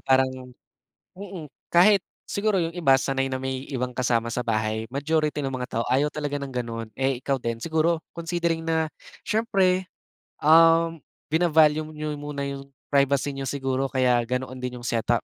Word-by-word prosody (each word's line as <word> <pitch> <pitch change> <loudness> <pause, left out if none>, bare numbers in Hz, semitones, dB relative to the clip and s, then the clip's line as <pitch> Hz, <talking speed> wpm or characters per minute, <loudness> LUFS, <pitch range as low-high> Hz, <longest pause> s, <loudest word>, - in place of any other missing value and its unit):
parang 130 0 +3 0.9
mm, 185 -5 -7 0.2
kahit 195 +4 +6 0.3
siguro 205 0 0
yung 165 -1 -1
iba 155 -7 +4
sanay 135 0 0
na 130 - -3
may 130 0 -4
ibang 125 -3 -3
kasama 120 -2 0
sa - - -2
bahay, 110 0 -1
majority 150 +2 -1
ng 135 - -2
mga 125 -1 -4
tao 115 - +1
ayaw 140 +3 +3
talaga 145 -1 -3
ng 140 -1 -6
ganun. 115 -2 -4
Eh 135 0 0
ikaw 135 +1 0
din 115 -1 -3
siguro 160 +3 +1 0.2
considering 170 -1 -1
na 160 -1 +1 0.4
siyempre, 190 -4 +2 0.5
um, 165 +1 +5 0.3
vina-value 155 -1 +4
niyo 150 -1 -4
muna 145 -1 -5
yung 140 0 -7 0.2
privacy 140 0 +2
niyo 135 0 -5
siguro 135 0 -1
kaya 125 -2 +2
ganoon 130 +1 -3
din 125 0 -4
yung 120 - -12
set-up 115 +1 +1
140 Hz, 160 wpm, -25 LUFS, 130-160 Hz, 0.9 s, kahit